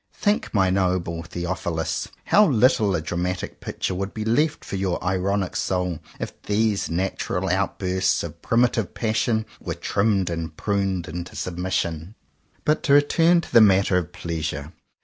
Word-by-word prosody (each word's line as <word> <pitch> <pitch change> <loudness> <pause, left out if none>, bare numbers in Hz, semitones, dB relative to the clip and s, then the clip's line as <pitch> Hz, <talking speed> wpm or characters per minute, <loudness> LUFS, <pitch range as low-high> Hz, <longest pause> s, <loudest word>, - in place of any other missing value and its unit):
Think, 205 +1 0
my 95 -3 +3
noble 90 -3 0
Theophilus, 85 -1 -3 0.2
how 210 0 +5
little 110 - +3
of 80 - -2
a - - -20
dramatic 90 +2 -3
picture - - -3
would 95 +2 -4
be 110 -1 -3
left 150 +8 +1
for - - -5
your 95 -2 0
ironic 95 +1 0
soul 90 -3 -1 0.2
if - - -6
these 105 -1 0
natural 95 +1 -1
outbursts 95 0 0
of 85 -1 -8
primitive 115 -4 +1
passion 110 0 0
were - - -4
trimmed 100 -3 +1
and 80 -2 -4
pruned 100 -4 -1
into 85 +3 -6
submission 90 0 -3 0.4
^ - - -34
But 150 +1 +2
to 140 - +2
return 165 +4 +5
to - - -12
the 115 - +8
matter 100 -2 +5
of 85 - -7
Pleasure. 80 -2 -4
95 Hz, 155 wpm, -24 LUFS, 85-110 Hz, 0.4 s, the